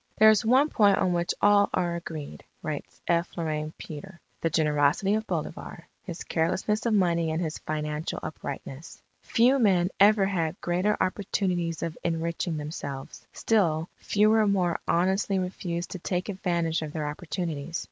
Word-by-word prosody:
'" - - -40
"There 220 0 +8
is 215 - +2
one 260 +6 +4
point 205 -6 +4
on 180 - +1
which 175 0 0
all 205 0 +5
are 175 -1 0
agreed," 160 -4 -7 0.2
writes 155 -4 -5
F. 170 +1 0
Loraine 155 -2 -2
Petre, 170 +4 -9 0.2
"the 165 - +1
generosity 150 +4 +2
of 220 +1 -1
Bolivar, - - -5 0.2
his 175 -4 -7
carelessness 190 +7 0
of 225 - +2
money 170 -4 +2
and 160 +1 -1
his 160 -3 -3
financial 150 0 -3
uprightness. 140 0 -7 0.2
Few 250 +4 +3
men 185 -5 +3
ever 205 0 +6
had 175 -3 -1
greater 180 +5 0
opportunities 180 -4 -1
of 165 -1 -3
enriching 165 0 -1
themselves; 145 -3 -7
still 170 -7 +1
fewer 215 +1 +3
more 185 -4 +1
honestly 190 +3 +1
refused 180 -2 -3
to 185 - -5
take 180 +3 -2
advantage 170 -4 -1
of 150 -2 -5
their 155 -2 -2
opportunities. 165 0 -4
175 Hz, 155 wpm, -27 LUFS, 160-195 Hz, 0.2 s, There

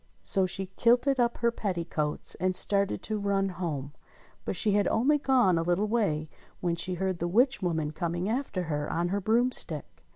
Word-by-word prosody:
So 190 - +2
she 195 +1 -1
kilted 250 +3 +3
up 240 -1 +1
her 235 0 +1
petticoats 170 -8 -1
and 185 +1 +1
started 200 +1 +3
to 215 -1 -3
run 200 -1 0
home; 155 -6 -5 0.5
but - - -3
she 215 - +1
had 205 0 +2
gone - - +1
only 280 +6 +2
a 235 -11 +4
little 175 +5 0
way 200 -9 0 0.3
when 175 -2 -1
she 180 +2 -2
heard 185 -1 -2
the 175 - -1
witch 245 +8 +2
woman 160 -4 -1
coming 175 +3 -3
after 225 -5 -2
her 150 -3 -3
on 170 +1 -1
her 200 +2 -1
broomstick. 235 +5 -1
190 Hz, 185 wpm, -28 LUFS, 170-225 Hz, 0.5 s, a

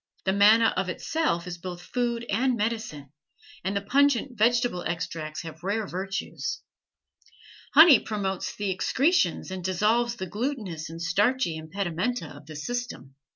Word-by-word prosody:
The 190 - +2
manna 215 +3 +6
of 185 0 -1
itself 235 - -1
is 175 -1 -6
both 175 0 -6
food 235 +1 -2
and 245 +4 +1
medicine, 210 - -3 0.5
and 195 +2 -1
the 200 - -3
pungent 270 +2 +2
vegetable 230 -3 +2
extracts 165 -2 -4
have 165 -1 -9
rare 205 +3 -1
virtues. 195 - -4 1.1
Honey 310 -5 +9
promotes 195 -4 -3
the 205 -2 -2
excretions 225 - +1
and 185 -1 -5
dissolves 220 +6 +1
the 190 - -5
glutinous 205 - -4
and 165 0 -8
starchy 195 +3 +1
impedimenta 175 +3 -3
of 145 0 -14
the 155 - -9
system. 240 - -5
200 Hz, 140 wpm, -26 LUFS, 175-240 Hz, 1.1 s, Honey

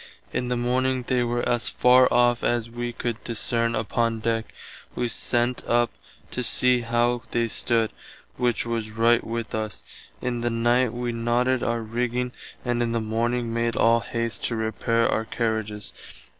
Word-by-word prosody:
In 125 - -1
the 125 0 0
morning 130 +1 +1
they 125 0 +1
were 120 0 -1
as 120 -1 +1
far 125 +1 +5
off 120 -1 +3
as 120 -1 0
[wee] 120 0 -3
could 120 -1 -4
discerne 115 0 +1
upon 115 +1 0
deck. 115 0 -1 0.4
Wee 120 - 0
sent 120 +1 0
up 120 0 +2 0.4
to 125 - -2
see 125 0 +3
how 120 +1 +1
they 115 0 0
stood, 115 0 +1 0.4
which 120 -2 +1
was 115 -2 -2
right 115 +2 +3
with 115 -1 -4
us. 110 -2 -3 0.4
In 120 -2 -2
the 120 - 0
night 120 +1 +2
wee 120 0 -3
knotted 120 +2 +1
our 115 -1 -1
rigging 120 +2 -2 0.3
and 120 -1 0
in 115 -1 0
the 115 - +1
morning 115 +2 -1
made 115 0 0
all 115 +1 +4
haist 115 -1 -3
to 115 - 0
repare 115 +1 +1
our 110 - 0
carriages. 110 -3 -2
120 Hz, 165 wpm, -25 LUFS, 115-120 Hz, 0.4 s, far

